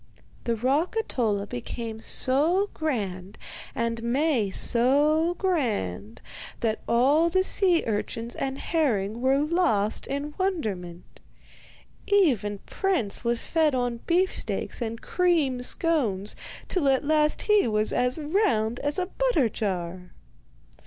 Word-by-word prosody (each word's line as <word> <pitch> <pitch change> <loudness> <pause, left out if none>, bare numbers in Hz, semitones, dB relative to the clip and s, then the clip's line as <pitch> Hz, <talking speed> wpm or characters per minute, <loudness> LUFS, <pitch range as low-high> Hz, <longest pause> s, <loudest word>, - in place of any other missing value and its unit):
The 235 - +1
rock 275 - 0
Ahtola 215 - -1
became 220 - -5
so 320 - +1
grand 200 - -3 0.4
and 230 0 -1
Maie 245 -2 +1
so 295 - +2
grand 120 - -2 0.4
that 220 -2 0
all 280 +8 +3
the 375 +2 +2
sea 370 -3 +2
urchins 230 +2 -3
and 270 0 -3
herring 235 - -1
were 265 +1 +3
lost 295 - +1
in 285 +2 -4
wonderment. 200 - -3 0.9
Even 260 - +2
Prince 360 - -1
was 235 0 0
fed 315 -4 +1
on 245 -2 -1
beefsteaks 360 -6 0
and 230 0 -3
cream 320 -9 +1
scones 245 - 0 0.3
till 310 -7 +1
at 270 +1 +1
last 305 0 +2
he 420 - +3
was 215 -1 +1
as 250 +3 +1
round 295 - 0
as 290 0 -1
a 365 - 0
butter 375 - +1
jar. 180 -4 -4
255 Hz, 120 wpm, -26 LUFS, 220-325 Hz, 0.9 s, all